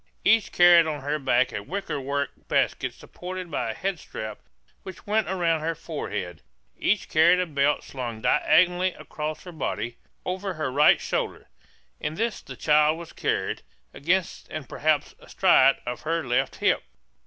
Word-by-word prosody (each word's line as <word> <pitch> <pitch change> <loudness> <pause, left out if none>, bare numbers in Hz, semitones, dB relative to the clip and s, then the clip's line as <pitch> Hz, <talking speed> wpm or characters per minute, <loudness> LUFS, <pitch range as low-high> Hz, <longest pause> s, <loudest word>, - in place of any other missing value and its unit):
Each 225 -2 +4
carried 175 -2 +7
on 150 -2 -3
her 145 +2 -2
back 130 -2 +2
a 105 - -3
wickerwork 140 - -3 0.2
basket - - 0
supported 180 -1 -8
by 115 - -2
a - - -2
head 190 +2 -2
strap 110 -6 -7 0.4
which 190 -2 -10
went 215 -1 +1
around 170 -4 +1
her 165 +1 -1
forehead. 90 - -5 0.3
Each 210 -1 0
carried 170 +3 +5
a 180 - +1
belt 145 -2 +1
slung 120 -4 -6
diagonally 180 +9 +3
across 155 0 -6
her 180 - -9
body, 120 -7 -4 0.3
over 185 +1 -3
her 155 -4 -2
right 145 +3 +5
shoulder; - - -3 0.5
in 150 - -3
this 230 +3 -2
the - - -10
child 150 +1 +3
was 170 -1 -10
carried, - - -1 0.3
against 175 +4 -1
and 155 -4 -6
perhaps 150 -1 0
astride 135 -8 +4
of 120 0 -4
her 165 0 -1
left 120 0 0
hip. - - +2
155 Hz, 155 wpm, -25 LUFS, 140-180 Hz, 0.5 s, carried